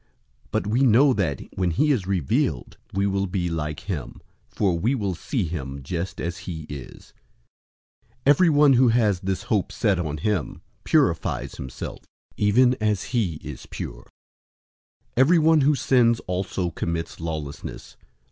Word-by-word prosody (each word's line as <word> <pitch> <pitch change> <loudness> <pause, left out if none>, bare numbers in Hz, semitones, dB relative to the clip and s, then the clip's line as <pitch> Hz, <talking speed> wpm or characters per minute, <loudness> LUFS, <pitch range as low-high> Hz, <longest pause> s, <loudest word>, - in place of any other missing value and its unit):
But - - -1
we 110 +5 +1
know 130 +2 +5
that, 85 - -1
when 90 -2 +1
he 150 - +2
is 105 -10 0
revealed, 85 -9 -1
we 100 +1 0
will 100 0 0
be 90 -2 -2
like 75 -1 -3
him; 95 -9 -5 0.3
for 95 -4 +1
we 120 +9 +1
will 100 -6 -1
see 105 - -2
him 70 -4 -5
just 85 +6 -4
as 85 0 -3
he 80 -3 -5
is. 70 -3 -10 0.9
003:003 - - -37
Everyone 145 -1 +5
who 130 0 +5
has 110 -5 +3
this 95 0 -2
hope 105 -4 0
set 100 -6 +1
on 75 -3 -2
him 95 +1 -2 0.2
purifies - - +1
himself, 65 -2 -7 0.4
even 125 +5 +4
as 105 -2 0
he 105 -10 +1
is 75 -2 -8
pure. - - -7 1.0
003:004 - - -42
Everyone 160 +3 +5
who 145 +2 +4
sins 120 -4 +3
also 90 -1 -2
commits 85 +1 -4
lawlessness. 80 -4 -6
95 Hz, 145 wpm, -24 LUFS, 80-120 Hz, 1.0 s, know